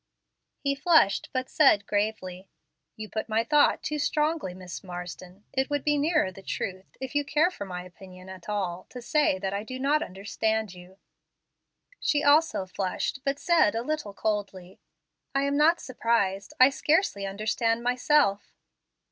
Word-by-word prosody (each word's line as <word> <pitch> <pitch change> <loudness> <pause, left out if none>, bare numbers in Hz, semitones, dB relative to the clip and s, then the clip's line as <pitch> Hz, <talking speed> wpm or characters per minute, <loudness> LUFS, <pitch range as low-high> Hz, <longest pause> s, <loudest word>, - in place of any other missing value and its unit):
He 280 -1 -1
flushed, 275 - +3
but 255 0 -2
said 215 -9 +4
gravely, 195 -3 -2 0.5
"You 215 0 -7
put 220 +1 -4
my 220 +1 +2
thought 295 +3 +3
too 300 0 -2
strongly, 300 - 0
Miss 185 0 -8
Marsden. 180 +1 -8
It 265 +1 0
would 290 -1 -1
be 295 0 +2
nearer 300 - +1
the 195 - -13
truth, 190 0 -5
if 265 -1 -6
you 290 0 +1
care 305 +5 +2
for 200 - -7
ray 180 -1 -6
opinion 185 +1 -13
at 190 0 -10
all, 185 -4 -3
to 250 - -8
say 270 -4 +1
that 190 0 -3
I 200 +1 -2
do 255 +3 -7
not 285 +3 +1
understand 215 - -2
you." 180 +1 -14 1.0
She 290 -1 +1
also 290 -8 +4
flushed, 185 +7 -3
but 275 0 -1
said 330 - +3
a 230 - -1
little 280 -8 -3
coldly, 200 -4 -3 0.6
"I 275 - +2
am 280 0 0
not 315 +4 +4
surprised; 230 -6 -1
I 255 +2 +8
scarcely 295 - +1
understand 225 +3 -1
myself." 250 -4 +2
220 Hz, 160 wpm, -27 LUFS, 190-285 Hz, 1.0 s, I